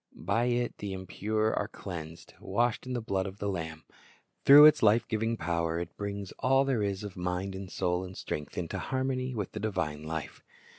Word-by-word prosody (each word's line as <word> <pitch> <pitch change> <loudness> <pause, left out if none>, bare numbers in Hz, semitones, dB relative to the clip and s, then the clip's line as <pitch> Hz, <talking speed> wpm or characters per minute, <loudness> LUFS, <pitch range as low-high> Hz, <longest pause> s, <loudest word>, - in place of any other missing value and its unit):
By 100 +8 0
it 120 0 0
the 100 -2 -4
impure 110 +3 -1
are - - -1
cleansed, 85 -3 -8
washed 120 +5 0
in 130 - -3
the 120 -2 -2
blood 95 -2 -1
of 95 +1 -8
the 100 - -3
Lamb. 80 -4 -4 0.6
Through 145 +2 +11
its 155 -1 +7
life 110 +2 +4
giving 115 +1 -1
power 85 -1 -1
it 85 0 -6
brings 100 -1 -5
all 135 +1 +4
there 130 -5 +1
is 100 -1 -1
of 100 -2 -7
mind 90 +2 -2
and 95 -1 -7
soul 90 -1 0
and 95 0 -8
strength 75 -1 -5
into 85 -2 -3
harmony 130 -1 -2
with 105 -4 -3
the 110 - -5
divine 90 -8 -2
life. 80 0 -5
100 Hz, 195 wpm, -30 LUFS, 90-115 Hz, 0.6 s, Through